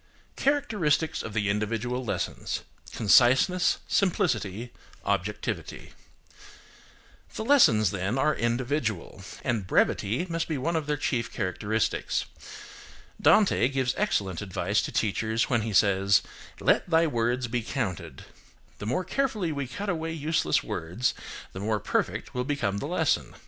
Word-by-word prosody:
CHARACTERISTICS 210 - +1
OF 115 - -6
THE 105 -2 +1
INDIVIDUAL 115 +5 -1
LESSONS:– 115 - -3 0.3
CONCISENESS, 130 - +4
SIMPLICITY, 120 - 0 0.3
OBJECTIVITY. 100 +1 -3 1.4
The 220 - -4
lessons, 115 - +5
then, 100 +5 -2
are 150 +3 +3
individual, 120 - -2 0.2
and 115 -7 -1
brevity 110 - +1
must 165 -1 -2
be 155 - -2
one 165 +6 -1
of 155 -2 -1
their 150 0 0
chief 125 -5 -1
characteristics. 105 +3 -1 1.0
Dante 210 - +5
gives 130 -2 0
excellent 100 - -1
advice 100 +1 0
to - - -4
teachers 110 +3 0
when 115 -2 +3
he 110 0 -3
says, 100 -1 +4 0.4
"Let - - +2
thy 165 0 +4
words 120 -2 0
be 120 +1 -1
counted." 110 - -4 0.5
The 105 - -5
more 130 +11 0
carefully 215 -4 -1
we 140 -3 -3
cut 200 +11 -6
away 165 -3 -2
useless 155 - +1
words, 90 +10 -2 0.4
the 95 - -6
more 105 +1 0
perfect - - -2
will 125 - -1
become 125 -8 -1
the - - -4
lesson. - - 0
120 Hz, 130 wpm, -27 LUFS, 105-160 Hz, 1.4 s, lessons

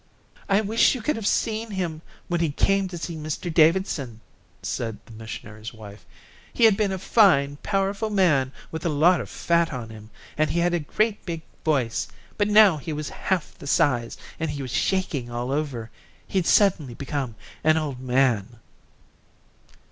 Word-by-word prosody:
"I 200 +2 +4
wish 220 +5 +3
you 250 - -5
could 300 - +1
have 220 -2 -3
seen 225 0 0
him 175 -6 -3 0.3
when 175 -1 0
he 165 -2 +1
came 195 +6 +1
to 180 -1 -7
see 170 0 -5
Mr 155 +2 -4
Davidson," 155 - +2 0.4
said 115 -2 -3
the 115 - -14
missionary's 110 0 -8
wife. 105 -1 -12 0.4
"He - - -1
had 220 -3 +7
been 205 -1 0
a 190 - -2
fine, 175 -9 +4
powerful 200 +2 -1
man, 160 -11 +2 0.2
with 160 0 -5
a 170 - +1
lot 165 +4 +4
of - - -8
fat 170 -1 +1
on 120 -4 -6
him, 110 -1 -12 0.3
and 155 -1 +3
he 165 - -1
had 175 0 +2
a 175 - +2
great 210 +8 -1
big 165 -2 -5 0.2
voice, 135 -7 0 0.3
but 205 - +1
now 210 -5 +6
he 150 +3 -6
was 150 0 -4
half 185 -5 -2
the - - -9
size, 120 -5 +1 0.2
and 160 - -1
he 145 -1 -4
was 130 - -6
shaking 160 -10 -1
all 120 +2 -3
over. 135 -6 -3 0.3
He'd 185 -3 -1
suddenly 170 - +3
become 135 -4 -4 0.3
an 155 +1 +4
old 145 -5 -3
man." 125 -4 +1
155 Hz, 175 wpm, -24 LUFS, 130-190 Hz, 0.4 s, had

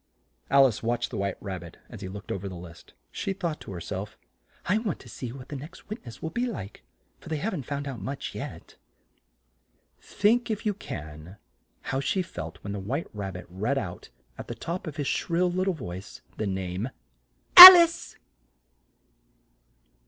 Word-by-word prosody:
Al 140 0 +6
ice 115 -5 -1
watched 120 +1 -2
the - - -5
White 100 -1 -3
Rab 95 -3 -6
bit 85 -1 -13
as - - -12
he - - -6
looked 100 +2 -9
o - - -2
ver 100 - -7
the 90 - -9
list. 85 -1 -13 0.2
She 195 - -4
thought 170 -5 -5
to - - -10
her 90 - -6
self, - - -7 0.5
"I 205 +5 +1
want 215 -7 -4
to - - -15
see 125 -3 -7
what 130 0 -11
the 145 - -6
next 150 +10 -11
witness 135 - -9
will 160 - -4
be 245 +1 -2
like, 105 - -8 0.4
for - - -13
they 160 - -2
haven't 165 - -4
found 145 0 -4
out 130 -4 -7
much 140 +1 -6
yet." - - -9 1.2
Think, 235 +4 0
if 215 -1 -4
you 210 - +1
can, 80 - -10 0.4
how 135 - -3
she 180 +8 -1
felt 80 - -8
when 100 - -5
the 100 - -5
White 130 - -4
Rab 100 -3 -6
bit 90 -1 -9
read 105 +10 -3
out, 90 -9 -6 0.3
at - - -8
the - - -6
top 175 +1 -6
of 150 - -7
his 145 -3 -4
shrill 175 +5 0
lit 185 +1 -1
tle 190 -2 -1
voice, 95 - -9
the 110 - -3
name 95 +3 -4 0.7
"Al 365 0 +16
ice!" 335 -1 0
135 Hz, 190 wpm, -26 LUFS, -, 1.2 s, Al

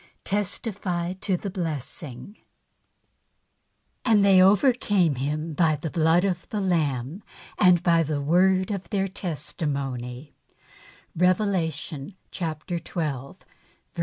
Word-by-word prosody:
Testify 195 -3 -2
to 190 0 -1
the 200 +2 -5
Blessing. 160 - -5 1.7
And 215 -4 +4
they 190 -2 +6
overcame 200 - +4
him 150 +5 -3
by 155 0 +3
the 155 +1 -5
Blood 165 +3 +3
of 180 -3 -2
the 215 - -3
Lamb^ 160 - -1 0.4
and 180 -1 +5
by 170 -2 +4
the 150 -2 -1
word 185 +6 +3
of 195 -4 -5
their 195 -1 0
testimony 140 -7 -4 0.4
— - - -25
Rev. 180 +2 +4 0.3
xii. 155 +4 -8
175 Hz, 105 wpm, -25 LUFS, 150-190 Hz, 1.7 s, they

